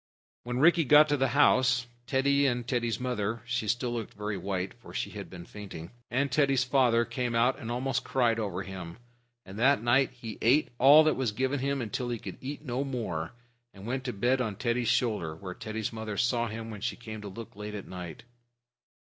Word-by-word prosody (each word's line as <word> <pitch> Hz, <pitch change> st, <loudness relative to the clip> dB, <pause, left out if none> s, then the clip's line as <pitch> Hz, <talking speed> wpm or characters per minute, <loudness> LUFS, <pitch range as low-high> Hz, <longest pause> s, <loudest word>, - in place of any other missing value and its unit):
When 120 Hz, 0 st, -2 dB
Rikki 165 Hz, +4 st, +5 dB
got 150 Hz, +2 st, +7 dB
to 145 Hz, -, +2 dB
the 135 Hz, 0 st, +2 dB
house, 130 Hz, -3 st, +4 dB, 0.2 s
Teddy 140 Hz, +1 st, +3 dB
and 120 Hz, -2 st, -1 dB
Teddy's 120 Hz, -3 st, 0 dB
mother 115 Hz, -3 st, -2 dB
(she 120 Hz, -2 st, -2 dB, 0.2 s
looked 120 Hz, -3 st, -4 dB
very 105 Hz, 0 st, -3 dB
white 95 Hz, -1 st, -3 dB
still, -, -, -21 dB
for -, -, -12 dB
she -, -, -2 dB
had -, -, -7 dB
been 90 Hz, -2 st, -9 dB
fainting) 90 Hz, -6 st, -9 dB, 0.2 s
and 135 Hz, +2 st, 0 dB
Teddy's 135 Hz, -2 st, +3 dB
father 125 Hz, -3 st, +3 dB
came 120 Hz, 0 st, -2 dB
out 125 Hz, +4 st, +3 dB
and 115 Hz, -4 st, -6 dB
almost 130 Hz, +2 st, -1 dB
cried 120 Hz, -3 st, +1 dB
over 100 Hz, -3 st, -3 dB
him; 90 Hz, -2 st, -8 dB, 0.5 s
and 95 Hz, +3 st, -9 dB
that 135 Hz, -1 st, +4 dB
night 130 Hz, +3 st, +4 dB
he 115 Hz, -3 st, -8 dB
ate 135 Hz, +7 st, +4 dB
all 145 Hz, +5 st, +8 dB
that 155 Hz, -, +2 dB
was 130 Hz, -4 st, 0 dB
given 130 Hz, +5 st, -1 dB
him 135 Hz, -3 st, -1 dB
till 125 Hz, -1 st, -2 dB
he 120 Hz, -, -2 dB
could -, -, -8 dB
eat 145 Hz, +3 st, -6 dB
no 125 Hz, +1 st, -1 dB
more, 110 Hz, -, -3 dB, 0.4 s
and 95 Hz, 0 st, -11 dB
went 130 Hz, +3 st, -2 dB
to 125 Hz, -, -1 dB
bed 125 Hz, +5 st, +1 dB
on 110 Hz, -5 st, -2 dB
Teddy's 120 Hz, +2 st, -1 dB
shoulder, 105 Hz, -10 st, 0 dB
where 90 Hz, +2 st, -7 dB
Teddy's 110 Hz, +3 st, -4 dB
mother 110 Hz, -2 st, -5 dB
saw 120 Hz, +1 st, +1 dB
him 115 Hz, 0 st, -6 dB
when 105 Hz, -2 st, -8 dB
she 120 Hz, -, -2 dB
came 110 Hz, -3 st, -8 dB
to 105 Hz, -, -7 dB
look 110 Hz, +3 st, -9 dB
late 105 Hz, +1 st, -6 dB
at 100 Hz, -, -7 dB
night. 90 Hz, +2 st, -8 dB
120 Hz, 210 wpm, -29 LUFS, 105-130 Hz, 0.5 s, all